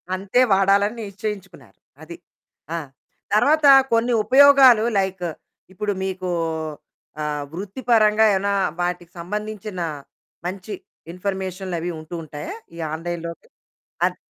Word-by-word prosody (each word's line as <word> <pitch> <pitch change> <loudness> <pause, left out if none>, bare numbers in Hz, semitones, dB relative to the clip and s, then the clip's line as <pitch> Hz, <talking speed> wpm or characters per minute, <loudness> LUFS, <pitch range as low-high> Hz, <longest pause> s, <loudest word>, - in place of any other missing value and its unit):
అంతే 195 +6 0
వాడాలని 200 +3 +3
నిశ్చయించుకున్నారు 200 -2 -7 0.3
అది. 170 +2 -9 0.6
ఆ! - - -1 0.6
తర్వాత 295 +7 +4 0.3
కొన్ని 235 +1 +2
ఉపయోగాలు 265 -4 +7 0.2
లైక్ 190 -2 -2 0.5
ఇప్పుడు 210 +1 -2
మీకు 185 -1 -3 0.9
ఆహ్, 150 -1 -2
వృత్తిపరంగా 215 +2 +2
ఏవైనా 200 +1 0 0.3
వాటికి 175 -1 -3
సంబంధించిన 210 +1 -5 0.6
మంచి 190 +3 -5 0.4
ఇన్ఫర్మేషన్లు 190 0 -4
అవి 175 +2 -3
ఉంటూ 155 +2 -8
ఉంటాయా? 155 - -7 0.2
ఈ - - -11 0.2
ఆన్లైన్‌లోకి 170 0 -6 0.6
అద్ - - -3
195 Hz, 100 wpm, -22 LUFS, 175-215 Hz, 0.9 s, ఉపయోగాలు